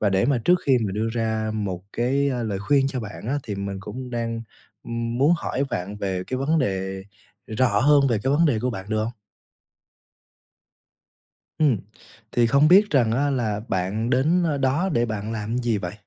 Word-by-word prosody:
Và 105 Hz, -, +2 dB
để 95 Hz, +1 st, +2 dB
mà 140 Hz, -2 st, +2 dB
trước 180 Hz, -, +5 dB
khi 140 Hz, -, +4 dB
mà 95 Hz, -, -3 dB
đưa 110 Hz, +2 st, -1 dB
ra 110 Hz, -1 st, -1 dB
một 95 Hz, -4 st, -3 dB
cái, 135 Hz, +4 st, +1 dB
a, 125 Hz, -2 st, -2 dB
lời 105 Hz, -3 st, -2 dB
khuyên 135 Hz, +7 st, +2 dB
cho 135 Hz, -2 st, -3 dB
bạn 105 Hz, -1 st, -8 dB
á 140 Hz, +4 st, 0 dB
thì 105 Hz, -, -5 dB
mình 100 Hz, 0 st, -4 dB
cũng 125 Hz, +5 st, -7 dB
đang 115 Hz, -1 st, -3 dB, 0.8 s
muốn 145 Hz, +5 st, +4 dB
hỏi 140 Hz, -5 st, -2 dB
vạn 95 Hz, +3 st, -4 dB
về 95 Hz, -2 st, -3 dB
cái 130 Hz, -, -3 dB
vấn 145 Hz, +5 st, +1 dB
đề 95 Hz, -6 st, -2 dB, 0.4 s
rõ 110 Hz, -2 st, +1 dB
hơn 145 Hz, +3 st, +5 dB
về 115 Hz, -4 st, +1 dB
cái 135 Hz, -, +1 dB
vấn 165 Hz, +4 st, +4 dB
đề 125 Hz, -7 st, +2 dB
của 125 Hz, +3 st, -1 dB
bạn, 95 Hz, -5 st, -6 dB
được 110 Hz, -, 0 dB
hông? 115 Hz, -, -2 dB, 2.5 s
Ừm, 145 Hz, -7 st, +3 dB, 0.6 s
thì 120 Hz, -1 st, +3 dB
không 140 Hz, +6 st, +4 dB
biết 200 Hz, +4 st, +6 dB
rằng 120 Hz, -6 st, +3 dB
á 140 Hz, +4 st, +1 dB
là 110 Hz, -6 st, -1 dB
bạn 100 Hz, +6 st, -1 dB
đến 155 Hz, +8 st, +3 dB
nơi 155 Hz, -4 st, 0 dB
đó 140 Hz, +7 st, +1 dB
để 120 Hz, -1 st, +2 dB
bạn 110 Hz, 0 st, -4 dB
làm 110 Hz, +2 st, -3 dB
gì 120 Hz, -3 st, 0 dB
vậy? 90 Hz, -2 st, -5 dB
115 Hz, 200 wpm, -24 LUFS, 105-135 Hz, 2.5 s, biết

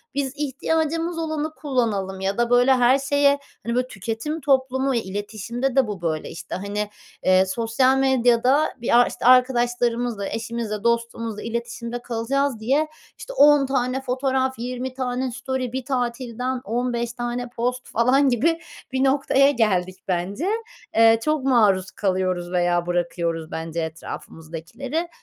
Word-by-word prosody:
biz 275 Hz, -2 st, -1 dB
ihtiyacımız 320 Hz, +4 st, -1 dB
olanı 315 Hz, -1 st, -2 dB
kullanalım 220 Hz, -9 st, -1 dB
ya 195 Hz, +1 st, -1 dB
da, 240 Hz, 0 st, +1 dB
böyle, 245 Hz, +2 st, +5 dB
her 255 Hz, +1 st, +4 dB
şeye, 285 Hz, 0 st, +3 dB, 0.3 s
hani, 235 Hz, +1 st, -1 dB
böyle, 250 Hz, 0 st, +1 dB
tüketim 230 Hz, -, -4 dB
toplumu 265 Hz, -1 st, +1 dB
iletişimde 220 Hz, +5 st, -3 dB
de 265 Hz, -3 st, +4 dB
bu 205 Hz, -4 st, -5 dB
böyle. 160 Hz, -2 st, -2 dB
İşte, -, -, -7 dB
hani, 205 Hz, +2 st, -3 dB, 0.3 s
eee, 185 Hz, 0 st, +5 dB
sosyal 230 Hz, +6 st, +2 dB
medyada 260 Hz, +2 st, +3 dB
bir 235 Hz, -, +3 dB
ar 245 Hz, -, +5 dB
işte, -, -, -6 dB
arkadaşlarımızla, 240 Hz, -3 st, +3 dB
eşimizle, 225 Hz, -2 st, -4 dB
dostumuzla 230 Hz, -2 st, -1 dB
iletişimde 235 Hz, +1 st, -4 dB
kalacağız 245 Hz, +2 st, -1 dB
diye, 275 Hz, +8 st, +1 dB, 0.3 s
işte, -, -, -8 dB
10 290 Hz, -, +6 dB
tane 260 Hz, 0 st, -1 dB
fotoğraf, 260 Hz, 0 st, -1 dB
20 250 Hz, +2 st, -4 dB
tane 255 Hz, 0 st, -2 dB
story 260 Hz, 0 st, -3 dB
bir 260 Hz, -1 st, -3 dB
tatilden 250 Hz, 0 st, -2 dB
15 235 Hz, +1 st, -2 dB
tane 240 Hz, 0 st, -4 dB
post 250 Hz, +1 st, -3 dB
falan 260 Hz, +4 st, +3 dB
gibi 315 Hz, +8 st, +2 dB, 0.3 s
bir 260 Hz, 0 st, 0 dB
noktaya 275 Hz, 0 st, +4 dB
geldik, 185 Hz, -7 st, +1 dB
bence. 190 Hz, -, -2 dB, 0.5 s
Eee, 225 Hz, 0 st, +6 dB
çok 305 Hz, -2 st, 0 dB
maruz 210 Hz, -8 st, +3 dB
kalıyoruz 185 Hz, -3 st, -1 dB
veya 175 Hz, -1 st, +1 dB
bırakıyoruz, 170 Hz, -2 st, -2 dB
bence, 165 Hz, +1 st, -3 dB
etrafımızdakileri. 165 Hz, -, -6 dB
245 Hz, 135 wpm, -23 LUFS, 215-265 Hz, 0.5 s, 10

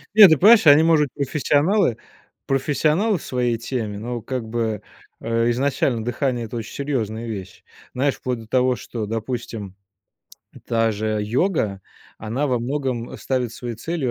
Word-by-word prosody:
Нет, 205 Hz, -5 st, +10 dB
ты 160 Hz, -, +5 dB
понимаешь, 210 Hz, -, +7 dB
они, 145 Hz, +2 st, +8 dB
может 160 Hz, -3 st, +4 dB
быть, 140 Hz, -2 st, -2 dB
профессионалы 150 Hz, -, +2 dB, 0.5 s
профессионалы 155 Hz, -, +1 dB
в -, -, -11 dB
своей 125 Hz, -2 st, 0 dB
теме, 115 Hz, -3 st, -4 dB
но, 120 Hz, +1 st, -4 dB
как 130 Hz, -2 st, -4 dB
бы, 110 Hz, -2 st, -2 dB, 0.4 s
э, 115 Hz, +1 st, 0 dB
изначально 130 Hz, -2 st, 0 dB
дыхание- 125 Hz, -1 st, -1 dB
это 115 Hz, -, -8 dB
очень 115 Hz, -1 st, -6 dB
серьезная 115 Hz, -5 st, -3 dB
вещь. 95 Hz, -4 st, -7 dB, 0.3 s
Знаешь, 135 Hz, +2 st, 0 dB
вплоть 125 Hz, -2 st, -3 dB
до 110 Hz, -, -12 dB
того, 125 Hz, +1 st, +2 dB
что, 110 Hz, -3 st, -5 dB
допустим, 115 Hz, -3 st, -5 dB, 0.9 s
та 115 Hz, -1 st, +2 dB
же 110 Hz, 0 st, -2 dB
йога, 110 Hz, -, 0 dB, 0.4 s
она 125 Hz, +7 st, -2 dB
во 125 Hz, -, +1 dB
многом 125 Hz, -1 st, -3 dB
ставит 125 Hz, -3 st, -2 dB
своей 120 Hz, -2 st, -6 dB
целью 150 Hz, -1 st, -2 dB
125 Hz, 155 wpm, -22 LUFS, 115-145 Hz, 0.9 s, Нет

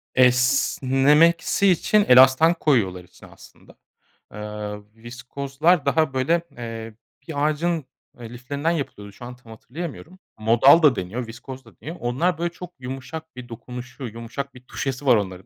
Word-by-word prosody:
Esnemesi 135 Hz, +7 st, +3 dB
için 200 Hz, +3 st, +3 dB
elastan 130 Hz, +6 st, +6 dB
koyuyorlar 110 Hz, -, 0 dB
içine 90 Hz, -, -17 dB
aslında. -, -, -18 dB, 0.6 s
Iıı, 105 Hz, 0 st, -6 dB
viskozlar 135 Hz, +7 st, -1 dB
daha, 155 Hz, 0 st, +1 dB
böyle, 140 Hz, +6 st, +1 dB, 0.2 s
eee, 115 Hz, -2 st, -7 dB, 0.3 s
bir 145 Hz, -2 st, -1 dB
ağacın, 155 Hz, 0 st, -1 dB, 0.3 s
eee, 115 Hz, -2 st, -9 dB
liflerinden 140 Hz, +6 st, -3 dB
yapılıyordu. 105 Hz, -11 st, -5 dB
Şu 120 Hz, -, -11 dB
an 125 Hz, +1 st, -9 dB
tam 120 Hz, -2 st, -17 dB
hatırlayamıyorum. 160 Hz, +9 st, -9 dB, 0.2 s
Modal 120 Hz, +8 st, +5 dB
da 145 Hz, -4 st, +6 dB
deniyor, 110 Hz, +7 st, -5 dB
viskoz 130 Hz, +3 st, -10 dB
da -, -, -20 dB
deniyor. 165 Hz, +3 st, -7 dB
Onlar 145 Hz, +9 st, 0 dB
böyle 170 Hz, +1 st, -2 dB
çok 180 Hz, 0 st, -10 dB
yumuşak 135 Hz, +5 st, -8 dB
bir 125 Hz, -1 st, -10 dB
dokunuşu, 125 Hz, +3 st, -9 dB
yumuşak 115 Hz, +5 st, -7 dB
bir 125 Hz, -, -14 dB
tuşesi 135 Hz, +1 st, -4 dB
var 125 Hz, -3 st, +6 dB
onların. 95 Hz, -3 st, -3 dB
130 Hz, 145 wpm, -23 LUFS, 120-155 Hz, 0.6 s, elastan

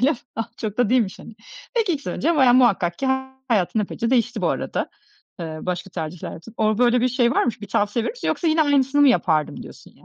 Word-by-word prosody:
öyle 265 Hz, +4 st, +4 dB
mi? -, -, -6 dB, 0.2 s
Ah, 225 Hz, +1 st, -3 dB
çok 215 Hz, -1 st, -5 dB
da 245 Hz, -4 st, +2 dB
değilmiş, 235 Hz, -6 st, +1 dB
hani. 225 Hz, -, -12 dB, 0.4 s
Peki, 435 Hz, -7 st, +1 dB
2 285 Hz, -, -3 dB
sene -, -, -4 dB
önce 330 Hz, +1 st, 0 dB
bayağı, 255 Hz, -3 st, +5 dB
muhakkak 195 Hz, -9 st, +3 dB
ki 270 Hz, -, -1 dB, 0.4 s
hayatın 215 Hz, -1 st, +1 dB
epeyce 230 Hz, +3 st, -3 dB
değişti 245 Hz, -4 st, +1 dB
bu 170 Hz, -, +2 dB
arada, -, -, -2 dB, 0.5 s
eee, 160 Hz, -2 st, -5 dB
başka 180 Hz, +1 st, -4 dB
tercihler 165 Hz, -1 st, -6 dB
yaptın. 210 Hz, +8 st, -12 dB
Orada 215 Hz, -1 st, +1 dB
böyle 240 Hz, 0 st, +3 dB
bir 250 Hz, -, +2 dB
şey 245 Hz, -1 st, +2 dB
var -, -, +2 dB
mı, 245 Hz, -, +2 dB
bir 205 Hz, -, -8 dB
tavsiye 210 Hz, +3 st, 0 dB
verir -, -, -2 dB
misin -, -, -5 dB
yoksa 340 Hz, -, 0 dB
yine 315 Hz, 0 st, +3 dB
aynısını 285 Hz, -1 st, +2 dB
mı 285 Hz, -, +7 dB
yapardım 160 Hz, -, +1 dB
diyorsun -, -, -14 dB
ya? -, -, -23 dB
235 Hz, 240 wpm, -22 LUFS, 195-265 Hz, 0.5 s, mı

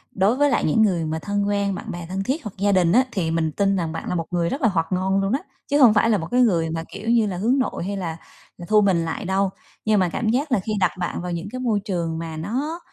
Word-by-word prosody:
đối 200 Hz, +5 st, +3 dB
với 290 Hz, +2 st, +3 dB
lại -, -, +1 dB
những 155 Hz, +8 st, +3 dB
người 180 Hz, -6 st, +2 dB
mà 160 Hz, +1 st, -2 dB
thân 205 Hz, +2 st, -1 dB
quen, 200 Hz, -1 st, 0 dB
bạn -, -, -6 dB
bè 175 Hz, -1 st, -6 dB
thân 190 Hz, +1 st, -2 dB
thiết 275 Hz, +10 st, -2 dB
hoặc 210 Hz, -, -5 dB
gia 200 Hz, +1 st, +2 dB
đình 180 Hz, -3 st, +3 dB
á, 250 Hz, +6 st, +5 dB
thì 170 Hz, -7 st, -1 dB
mình 165 Hz, -1 st, 0 dB
tin 195 Hz, +4 st, +1 dB
rằng 170 Hz, -4 st, -2 dB
bạn 165 Hz, -, -5 dB
là -, -, -1 dB
một 165 Hz, -2 st, -2 dB
người 170 Hz, -1 st, 0 dB
rất 275 Hz, -, -4 dB
là 240 Hz, -, +4 dB
hoạt 165 Hz, -6 st, 0 dB
ngôn 190 Hz, +1 st, +1 dB
luôn 195 Hz, +3 st, 0 dB
á, 270 Hz, -, +2 dB, 0.3 s
chứ 285 Hz, -, +2 dB
hông 235 Hz, -4 st, +8 dB
phải 220 Hz, +2 st, +3 dB
là 215 Hz, -, +3 dB
một 165 Hz, -3 st, -5 dB
cái 250 Hz, -, +3 dB
người 170 Hz, -9 st, +2 dB
mà, 165 Hz, 0 st, -3 dB
kiểu 210 Hz, +3 st, -5 dB
như 230 Hz, -2 st, +3 dB
là, 185 Hz, -3 st, -3 dB
hướng 240 Hz, +9 st, +2 dB
nội 255 Hz, -, -2 dB
hay 200 Hz, +1 st, -3 dB
là 165 Hz, -4 st, -4 dB, 0.4 s
là 175 Hz, -, -8 dB
thu 215 Hz, -1 st, +5 dB
mình 180 Hz, -4 st, +2 dB
lại 165 Hz, +5 st, -4 dB
đâu. 190 Hz, +1 st, +1 dB, 0.4 s
Nhưng 215 Hz, -1 st, +3 dB
mà 185 Hz, -2 st, +2 dB
cảm 220 Hz, +6 st, -1 dB
giác 270 Hz, +6 st, 0 dB
là 250 Hz, -, +3 dB
khi 205 Hz, +4 st, -5 dB
đặt -, -, +3 dB
bạn 175 Hz, -1 st, -3 dB
vào 180 Hz, 0 st, -4 dB
những 170 Hz, +2 st, -4 dB
cái 255 Hz, -, -5 dB
môi 230 Hz, -5 st, +1 dB
trường 175 Hz, -5 st, -3 dB
mà 165 Hz, -1 st, -6 dB
nó 270 Hz, -, -3 dB
195 Hz, 300 wpm, -23 LUFS, 170-220 Hz, 0.4 s, hông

